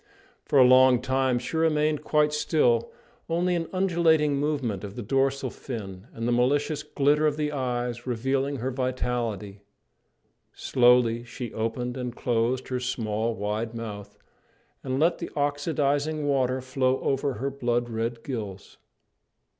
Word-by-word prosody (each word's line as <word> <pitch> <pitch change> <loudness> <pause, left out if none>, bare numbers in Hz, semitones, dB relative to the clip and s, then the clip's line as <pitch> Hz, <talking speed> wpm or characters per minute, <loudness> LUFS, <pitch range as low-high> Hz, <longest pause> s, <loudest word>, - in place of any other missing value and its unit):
For - - +1
a 130 - +9
long 130 0 +6
time 130 0 +1
she 125 +6 -4
remained 155 -2 +1
quite 150 -1 +2
still, 135 -6 +2 0.4
only 175 +2 +1
an 165 -2 -1
undulating 165 -6 +2
movement 140 -9 -1
of 100 0 -7
the 120 - -5
dorsal 135 +2 0
fin 100 -5 -7
and 115 +1 -4
the - - +1
malicious 140 +5 +1
glitter 150 +2 +2
of 150 0 -1
the 150 -1 -1
eyes 125 -3 -3
revealing 135 +4 0
her 130 +1 -3
vitality. 120 -6 -3 0.9
Slowly 120 -2 +3
she 120 0 -7
opened 120 +3 -3
and 125 -1 -4
closed 120 +2 0
her 130 -1 -1
small, 115 -2 -2
wide 110 +3 -3
mouth, 105 -3 -7 0.7
and 130 0 -2
let 170 +3 +2
the 170 - -5
oxidizing 145 0 0
water 130 -2 +1
flow 130 0 0
over 135 0 0
her 135 +5 -3
blood 120 -3 -1
red 115 0 -3
gills. 105 -7 -6
130 Hz, 140 wpm, -26 LUFS, 120-145 Hz, 0.9 s, a